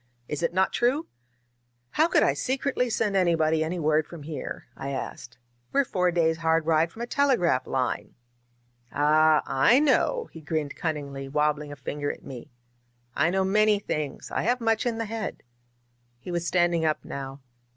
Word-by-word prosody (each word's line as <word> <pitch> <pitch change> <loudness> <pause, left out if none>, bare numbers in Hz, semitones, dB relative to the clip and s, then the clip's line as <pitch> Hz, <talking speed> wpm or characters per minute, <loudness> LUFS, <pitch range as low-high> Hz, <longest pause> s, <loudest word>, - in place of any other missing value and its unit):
Is 150 - -4
it 170 - +1
not 190 +2 +1
true?" 260 +7 +1 0.9
"How 315 - +3
could - - +3
I - - +3
secretly 260 -1 -1
send 215 -2 0
anybody 160 -4 +2
any 165 +3 -3
word 155 -1 +1
from 170 -4 -10
here?" 155 0 -6
I 135 - -5
asked. 130 -3 -6 0.3
We're 280 0 +3
four 180 -6 +1
days' 165 -2 +2
hard 165 -1 +1
ride 165 +1 +2
from 230 - -7
a - - -1
telegraph 240 - +2
line." 130 -2 -2 0.8
"Ah, 155 +1 +4
I 185 - +4
know," 380 - +2
he 160 - -11
grinned 155 -2 -3
cunningly, 140 -4 -4
wabbling 150 0 0
a - - -7
fin 145 +2 -6
ger 145 - 0
at - - -12
me. 125 -3 -9 0.7
^^I 155 +4 +2
know 190 +1 +1
many 210 +2 +4
things; 150 -8 -4
I - - 0
have 245 +2 +1
much 225 0 +1
in 230 -2 -1
the 225 - -2
head." 220 0 -5 0.7
He 125 +9 -8
was 175 0 -2
standing 175 -2 +2
up 155 -1 0
now. 135 0 -7
165 Hz, 175 wpm, -26 LUFS, 150-215 Hz, 0.9 s, Ah